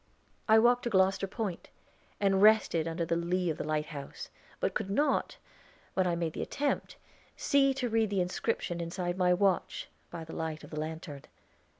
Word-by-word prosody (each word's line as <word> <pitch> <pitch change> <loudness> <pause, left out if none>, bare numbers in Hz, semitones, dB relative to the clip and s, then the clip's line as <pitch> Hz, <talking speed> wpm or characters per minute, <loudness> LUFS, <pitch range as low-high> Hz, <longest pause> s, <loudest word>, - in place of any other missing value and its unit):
I 220 - +8
walked 245 +2 +5
to - - +1
Gloster 195 -1 +3
Point, 195 -3 -4 0.5
and 195 -1 +3
rested 210 -6 +5
under 165 +1 -2
the 170 - 0
lee 175 +1 0
of 155 - -6
the - - -1
lighthouse, 150 -2 -4 0.3
but - - 0
could 195 - -2
not, 285 +10 +1 0.6
when 185 -1 +2
I 175 - +1
made 165 -2 -2
the - - -4
attempt, 285 0 -2 0.4
see 275 -1 +3
to 255 -2 -1
read 225 -2 +1
the 200 -1 0
inscription 180 -1 -1
inside 175 +1 -3
my 180 -1 +3
watch, 190 0 +1 0.2
by 165 - -6
the 160 - -10
light 160 -1 -4
of - - -12
the 150 - -4
lantern. 155 -2 -5
180 Hz, 180 wpm, -31 LUFS, 165-210 Hz, 0.6 s, I